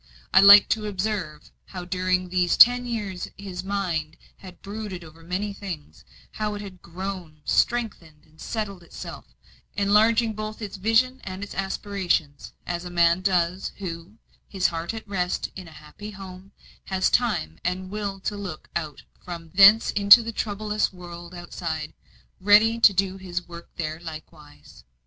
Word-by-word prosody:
I - - +8
liked 200 0 +9
to 215 -1 0
observe 190 -6 -4
how 180 -2 -8
during 185 0 0
these 180 -1 +1
ten 245 +1 +7
years 205 -6 -4
his 190 -3 -7
mind 175 -6 -2 0.2
had 185 -2 -14
brooded 200 -3 -6
over 160 0 -14
many 185 +5 -3
things; 185 -7 -8 0.3
how 210 -1 -3
it 205 - -6
had 185 -3 -11
grown, 175 -3 -7
strengthened, 190 -11 -1
and 155 +1 -20
settled 205 -5 -4
itself, 170 - -9 0.5
enlarging 220 +3 +3
both 215 0 -6
its 210 -3 -6
vision 225 +6 +2
and 190 +1 -6
its 200 - -7
aspirations; 190 -6 -2
as 175 0 -3
a 180 - -7
man 170 0 +3
does, 180 -1 0
who, 180 +2 -7 0.3
his 190 -2 -3
heart 165 0 -4
at 220 -1 -8
rest 180 -3 -2
in 185 -2 -9
a - - -12
happy 155 +7 -11
home, 190 -1 -11 0.3
has 190 -1 0
time 85 - 0
and 185 +1 -3
will 205 -2 -4
to 205 - -3
look 195 -6 -7
out 155 -4 -4 0.2
from 170 -2 -8
thence 200 +4 +7
into 205 +3 +8
the 230 - -4
troublous 210 0 -1
world 175 -1 -10
outside, 160 -3 -5 0.5
ready 210 +4 +5
to 225 - +7
do 195 0 0
his 180 -1 -5
work 170 0 -11
there 160 -1 -4
likewise. 155 - -12
185 Hz, 155 wpm, -25 LUFS, 170-205 Hz, 0.5 s, liked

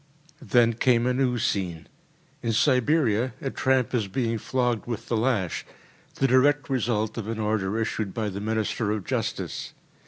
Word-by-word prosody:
Then 120 -4 +3
came 120 +1 +2
a 125 - +2
new 125 -1 +1
scene. 95 -8 -1 0.6
In 115 -1 -1
Siberia, 125 -2 +2
a 135 - -3
tramp 130 -2 +1
is 115 -5 +1
being 115 +2 -1
flogged 125 -1 -1
with 115 -4 -5
the 120 - +1
lash, 110 -6 0 0.5
the 135 - +1
direct 140 +3 +3
result 110 -3 0
of 110 - -5
an 115 0 -3
order 105 -1 0
issued 110 -2 -2
by 110 0 -2
the 100 +1 -5
Minister 110 0 -1
of 105 -3 -2
justice. - - -3
115 Hz, 160 wpm, -26 LUFS, 105-125 Hz, 0.6 s, Then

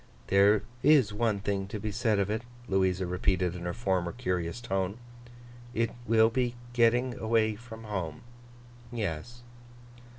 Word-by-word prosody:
'There 100 +2 +5 0.2
is 135 -7 +5
one 110 -1 +1
thing 100 -1 -2
to 105 +2 -5
be 105 +1 -3
said 110 0 +1
of 100 -1 +1
it,' 110 +1 -1 0.3
Louisa 95 -1 +1
repeated 90 0 0
in 90 -1 -6
her 90 - -1
former 95 -6 0
curious 90 -5 -2
tone; 95 -3 -2 0.8
'it 115 0 +1 0.2
will 110 0 +5
be 125 0 0 0.2
getting 120 +1 +3
away 110 -1 +2
from 115 0 -11
home. 95 -7 -4 0.7
Yes. 115 +2 -4
105 Hz, 140 wpm, -29 LUFS, 95-115 Hz, 0.8 s, There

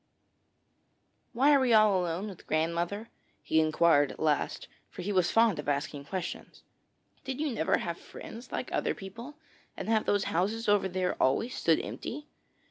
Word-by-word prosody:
'Why 275 +5 +4
are 280 - +6
we 255 -3 +3
all 210 -4 +5
alone 175 +4 -2
with 195 -4 -11
grandmother?' 170 +7 -1 0.3
he 160 - +2
inquired 155 -2 +3
at - - -12
last, 155 -2 0 0.2
for 180 - -8
he 205 - -2
was 185 -3 +2
fond 225 -7 +3
of 145 - -3
asking 145 0 -2
questions. 185 +2 -6 0.6
'Did 265 0 -5
you 305 -2 0
never 160 -8 +1
have 170 -1 -4
friends 235 +3 -10
like - - -4
other - - 0
people, 230 +9 -9 0.4
and - - -5
have 220 -1 +2
those 205 -1 +2
houses 210 +7 0
over 205 -2 +3
there 185 0 -2
always 180 - +2
stood 165 -1 +2
empty?' 295 +4 -6
190 Hz, 165 wpm, -30 LUFS, 165-225 Hz, 0.6 s, are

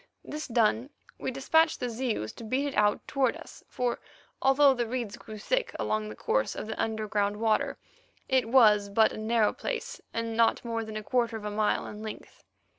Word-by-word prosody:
This 305 +1 -6
done, 230 +1 +2 0.3
we - - -2
dispatched 315 +5 +2
the 250 - -2
Zeus 230 - -2
to - - -10
beat 255 +6 0
it 285 - -3
out 210 0 +2
towards 265 -4 +1
us, - - -13
for 245 -1 -1 0.4
although 270 +1 +5
the 240 -2 -2
reeds 235 -4 -3
grew 215 - -10
thick - - -1
along 105 0 -1
the 105 - -8
course 105 0 0
of - - -5
the 220 - -4
underground 215 -2 -1
water, 220 -1 +1 0.5
it 260 -4 +2
was 210 -5 +5
but 220 +2 +4
a - - -7
narrow 220 -1 +2
place, 485 +1 -4
and 230 0 -3
not 230 +1 +2
more 230 -1 -2
than 220 -1 -6
a 215 - -5
quarter 235 0 0
of 210 - -9
a 210 - -3
mile 210 0 +1
in 210 - -8
length. 220 -1 -9
225 Hz, 195 wpm, -28 LUFS, 215-255 Hz, 0.5 s, although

